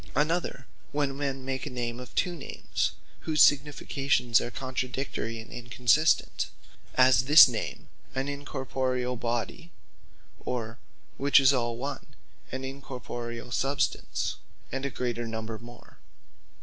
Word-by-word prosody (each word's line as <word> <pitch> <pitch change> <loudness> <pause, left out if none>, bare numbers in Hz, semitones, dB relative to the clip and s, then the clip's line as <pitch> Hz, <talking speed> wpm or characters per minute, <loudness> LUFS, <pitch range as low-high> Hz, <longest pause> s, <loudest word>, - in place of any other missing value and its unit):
Another, 150 -2 0 0.3
when 140 -2 0
men 135 -2 -3
make 135 +2 -3
a - - -3
name 120 -2 -3
of 125 - -10
two 180 -2 +1
Names, 155 - -2 0.3
whose 155 -1 -2
significations 140 -4 +3
are - - -3
contradictory 130 -1 -3
and 110 - -10
inconsistent; 120 +6 +2 0.5
as 130 0 +5
this 150 +2 +10
name, 120 -3 -4 0.3
an 135 0 0
Incorporeall 130 -3 -2
Body, 120 +8 -3 0.7
or 115 -1 -4 0.4
(which 140 +1 +6
is 135 0 +6
all 120 -2 0
one) 140 +4 -6 0.4
an 130 +1 -4
Incorporeall 125 -3 -6
Substance, 135 +4 0 0.3
and 135 +1 -2
a - - -3
great 125 -2 -2
number 110 -1 -4
more. 120 0 -14
130 Hz, 125 wpm, -28 LUFS, 120-140 Hz, 0.7 s, this